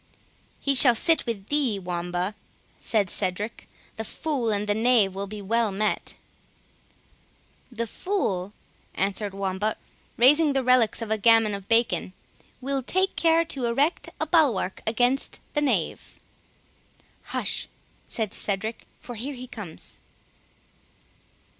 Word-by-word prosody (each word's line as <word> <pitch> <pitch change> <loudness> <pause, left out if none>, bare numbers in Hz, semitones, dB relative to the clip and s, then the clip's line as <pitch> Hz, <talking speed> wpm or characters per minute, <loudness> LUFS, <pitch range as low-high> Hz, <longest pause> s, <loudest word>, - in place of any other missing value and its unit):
"He 280 - +1
shall 250 -2 +8
sit 325 +5 +2
with 210 -4 -4
thee, 280 -8 +1
Wamba," 180 +1 -3 0.5
said 210 -4 +1
Cedric; 200 +3 -3 0.3
"the 220 - -3
fool 270 -1 -2
and 205 -1 0
the 205 - +2
knave 220 -3 +3
will 200 +1 -4
be 210 0 -7
well 225 +1 +1
met." 210 +2 -2 1.6
"The 235 -1 -2
fool," 205 - -2 0.4
answered 195 +1 -1
Wamba, 195 +2 -2 0.4
raising 290 +5 +5
the 270 -1 +1
relics 250 -3 +3
of 220 - -6
a 220 - +1
gammon 225 -1 +5
of 200 -1 -6
bacon, 230 -5 +2 0.5
"will 275 +1 -1
take 375 +9 0
care 330 0 +3
to 270 -6 -3
erect 280 +8 0
a - - 0
bulwark 275 - +2
against 245 +4 +1
the 295 - +1
knave." 290 - -1 1.1
"Hush," - - -2 0.4
said 220 -3 -2
Cedric, 215 +3 -2
"for 245 - -9
here 260 +5 -5
he 250 0 -8
comes." 205 -10 -9
225 Hz, 130 wpm, -25 LUFS, 200-265 Hz, 1.6 s, shall